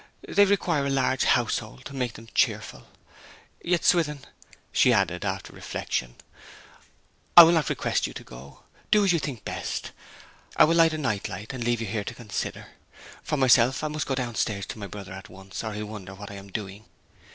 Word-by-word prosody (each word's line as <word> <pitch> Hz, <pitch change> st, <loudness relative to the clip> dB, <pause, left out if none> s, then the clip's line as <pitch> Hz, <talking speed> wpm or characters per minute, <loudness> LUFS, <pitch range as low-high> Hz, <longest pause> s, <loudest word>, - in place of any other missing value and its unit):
They 205 Hz, -, +5 dB
require 175 Hz, -8 st, +1 dB
a -, -, 0 dB
large 130 Hz, -1 st, +1 dB
household 120 Hz, 0 st, 0 dB
to 140 Hz, -, -8 dB
make 125 Hz, -4 st, -2 dB
them 115 Hz, -, -12 dB
cheerful.... -, -, 0 dB, 0.8 s
Yet, 170 Hz, -1 st, 0 dB
Swithin,' 150 Hz, -5 st, +2 dB, 0.5 s
she -, -, +4 dB
added, 90 Hz, -2 st, +1 dB
after 95 Hz, -1 st, -4 dB
reflection, -, -, -4 dB, 1.2 s
'I 175 Hz, -, +15 dB
will 165 Hz, -, +6 dB
not 160 Hz, -4 st, +2 dB
request -, -, 0 dB
you -, -, -9 dB
to -, -, -7 dB
go. 65 Hz, +3 st, -13 dB, 0.3 s
Do 210 Hz, -1 st, +4 dB
as 185 Hz, -, +4 dB
you 170 Hz, -, +2 dB
think 130 Hz, -7 st, -6 dB
best. -, -, -4 dB, 0.7 s
I -, -, +8 dB
will 160 Hz, -, +4 dB
light 165 Hz, -1 st, +5 dB
a -, -, -2 dB
night 110 Hz, -9 st, -2 dB
light, 105 Hz, +8 st, -7 dB
and 125 Hz, -2 st, -4 dB
leave 120 Hz, -1 st, 0 dB
you -, -, -2 dB
here 105 Hz, 0 st, -3 dB
to 120 Hz, -, -7 dB
consider. 115 Hz, -4 st, -5 dB, 0.5 s
For 150 Hz, -, -2 dB
myself, 130 Hz, 0 st, +4 dB
I 155 Hz, -, -1 dB
must 150 Hz, 0 st, -3 dB
go 135 Hz, -, 0 dB
downstairs 115 Hz, -5 st, -2 dB
to -, -, -6 dB
my 100 Hz, -, -5 dB
brother 100 Hz, 0 st, -9 dB
at 95 Hz, 0 st, -10 dB
once, 95 Hz, +3 st, -8 dB
or 110 Hz, -1 st, -4 dB
he'll 105 Hz, +1 st, -4 dB
wonder 100 Hz, -3 st, -8 dB
what 100 Hz, +1 st, -9 dB
I -, -, -8 dB
am 100 Hz, 0 st, -10 dB
doing.' 100 Hz, +1 st, -6 dB
120 Hz, 195 wpm, -26 LUFS, 100-150 Hz, 1.2 s, I